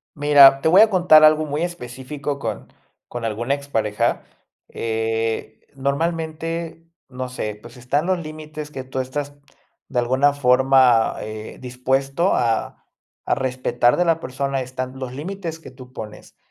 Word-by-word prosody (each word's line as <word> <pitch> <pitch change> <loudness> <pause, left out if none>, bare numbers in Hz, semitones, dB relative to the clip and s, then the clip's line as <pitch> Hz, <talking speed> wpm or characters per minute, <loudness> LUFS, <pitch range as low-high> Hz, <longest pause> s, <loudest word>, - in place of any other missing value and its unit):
Mira, 145 -2 +7
te 160 - +1
voy 185 +5 +7
a 220 - +5
contar 175 -5 +6
algo 155 0 +5
muy 150 +3 -2
específico, 140 -3 -5
con - - -6 0.4
con 120 -1 -6
alguna 115 +5 -1
expareja. 110 -7 -1 0.5
Eh, 115 0 -3
normalmente, 165 +3 -3 0.2
no 130 -1 -6
sé, 105 -4 -5
pues 120 +2 -14
están 135 +6 -1
los 185 -1 +1
límites 155 -1 -8
que 130 -2 -7
tú 130 0 -4
estás, 145 +2 -4 0.5
de 125 - -2
alguna 130 +4 +3
forma, 130 -3 +4
eh, 110 0 -8
dispuesto, 135 +7 0
a 115 -2 0 0.5
a - - +2
respetar 125 -2 +1
de 180 - +2
la 165 -2 +2
persona, 135 -1 -3
están 130 0 -6
los 130 -2 -6
límites 165 +3 -6
que 150 - -12
tú 130 -1 -14
pones. 105 -4 -10
135 Hz, 145 wpm, -21 LUFS, 125-155 Hz, 0.5 s, Mira